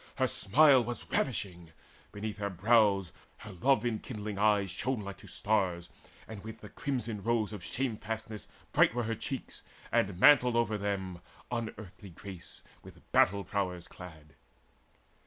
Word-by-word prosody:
Her 130 - +2
smile 130 +4 +5
was 120 +1 -5
ravishing: 90 - -2 0.4
beneath 105 +1 -5
her 100 -1 -1
brows 100 -2 +3 0.3
Her - - -10
love 130 +8 +2
enkindling 110 -3 -3
eyes 105 -3 +3
shone 125 +5 -2
like 100 -1 -7
to - - -13
stars, 90 -5 0 0.4
And 110 -3 -8
with 110 0 -9
the 105 - -10
crimson 120 -7 -3
rose 110 -1 0
of 105 - -6
shamefastness 110 -3 -4 0.2
Bright - - +4
were 120 - 0
her 115 +1 -1
cheeks, 130 +4 -5 0.3
and 95 -2 +1
mantled 125 -3 +7
over 115 -2 +2
them 95 -3 -3 0.3
Unearthly 105 -4 -6
grace 90 0 -9 0.2
with - - -16
battle 100 +2 +4
prowess 90 -4 -2
clad. 80 -4 -12
105 Hz, 140 wpm, -31 LUFS, 95-115 Hz, 0.4 s, mantled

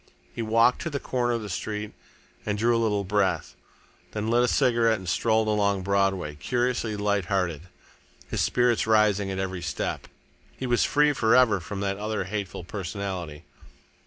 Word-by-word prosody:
He - - -4
walked 115 +2 +3
to 170 - -3
the 145 -3 -3
corner 120 -2 -1
of 115 -2 -2
the - - -6
street 105 +2 -4 0.5
and 105 -1 -2
drew 115 +3 +2
a 115 - +1
little 105 -3 +1
breath. 100 -1 0 0.6
Then 105 0 -3
he 110 - -1
lit 120 - +4
a 125 - +3
cigarette 115 -2 +3
and 95 -2 -10
strolled 110 +4 +1
along 100 -2 +1
Broadway, 95 -5 0
curiously 120 - -1
light 100 -2 0
hearted, 90 -3 -2 0.6
his - - -2
spirits 120 -3 +2
rising 105 -3 +3
at 95 - -3
every 95 -1 -3
step. 80 -4 -3 0.5
He 130 - -4
was 120 -1 +2
free 150 0 +3
for 115 -4 +3
ever 125 -6 +5
from 100 +3 -6
that 100 -1 -1
other 105 -1 -2
hateful 95 -2 -5
personality. 90 -4 -5
105 Hz, 175 wpm, -26 LUFS, 95-115 Hz, 0.6 s, ever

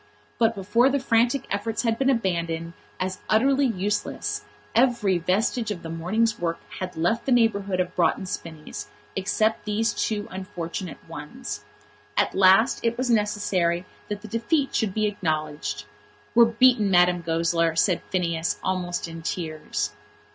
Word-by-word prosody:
But 225 0 +3
before 210 +6 +3
the 280 - +1
frantic 240 +1 +2
efforts 215 +4 -1
had 230 -1 0
been 270 0 +3
abandoned 170 -8 -1 0.3
as 185 0 -2
utterly 270 +5 +4
useless 205 -2 -2 0.3
every 230 -6 +3
vestige 215 +6 0
of 195 -5 -4
the 165 - -5
morning's 210 +7 0
work 165 -1 -1 0.2
had 185 -2 -5
left 225 - 0
the - - +1
neighbourhood 200 -6 +2
of 180 0 -1
Broughton 185 +2 +2
Spinnies, 160 -4 -6 0.3
except 215 +3 0
these 220 +2 +1
two 210 -2 -1
unfortunate 180 -3 -5
ones. 195 - -7 0.5
At - - +2
last 195 +6 +5
it 235 0 0
was 255 -1 0
necessary 195 -5 +1 0.2
that 205 0 -4
the - - -7
defeat 235 - 0
should 205 -4 0
be 215 -1 +2
acknowledged. 155 - -2 0.5
"We're 235 0 +8
beaten, 230 -2 +4
Madame 180 -1 +4
Goesler," 165 0 +1
said 175 +1 +2
Phineas, 170 -3 -1
almost 180 -2 -1
in 165 0 -8
tears. 160 -2 -3
195 Hz, 145 wpm, -25 LUFS, 170-230 Hz, 0.5 s, We're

